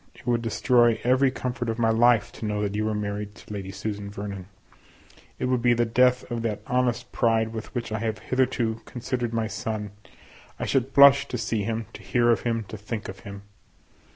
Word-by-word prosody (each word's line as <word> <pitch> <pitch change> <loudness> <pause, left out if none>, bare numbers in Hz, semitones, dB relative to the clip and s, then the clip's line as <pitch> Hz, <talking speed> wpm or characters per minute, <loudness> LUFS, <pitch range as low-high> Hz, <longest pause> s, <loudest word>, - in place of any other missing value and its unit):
It - - -17
would 120 -1 +1
destroy 120 0 +3
every 130 +2 +4
comfort 125 -2 -3
of 110 - -2
my 115 -1 +2
life 115 -1 +4
to - - -7
know 105 0 -1
that 100 -1 -2
you 105 +1 -1
were 110 0 -1
married 105 0 -4
to 105 - -11
Lady 95 -2 -5
Susan 100 +1 -5
Vernon; 100 -2 -6 0.9
it - - -2
would 125 -1 +1
be 120 0 +4
the 120 0 +2
death 125 +2 +3
of 120 -1 -2
that 110 -2 -3
honest 125 -1 0
pride 115 -1 +2
with 110 -1 -6
which 120 -2 -3
I 110 - -1
have 110 0 -2
hitherto 125 -3 0
considered 120 -1 -3
my 115 -1 0
son; 105 0 -4 0.7
I - - -2
should 135 -1 0
blush 140 0 +8
to 125 - -3
see 115 -2 -1
him, 115 0 -2
to - - -10
hear 120 -1 +2
of 115 - +2
him, 115 -2 -1
to 110 - -6
think 105 +1 -5
of 95 0 -8
him. 100 +1 -9
115 Hz, 210 wpm, -25 LUFS, 105-120 Hz, 0.9 s, blush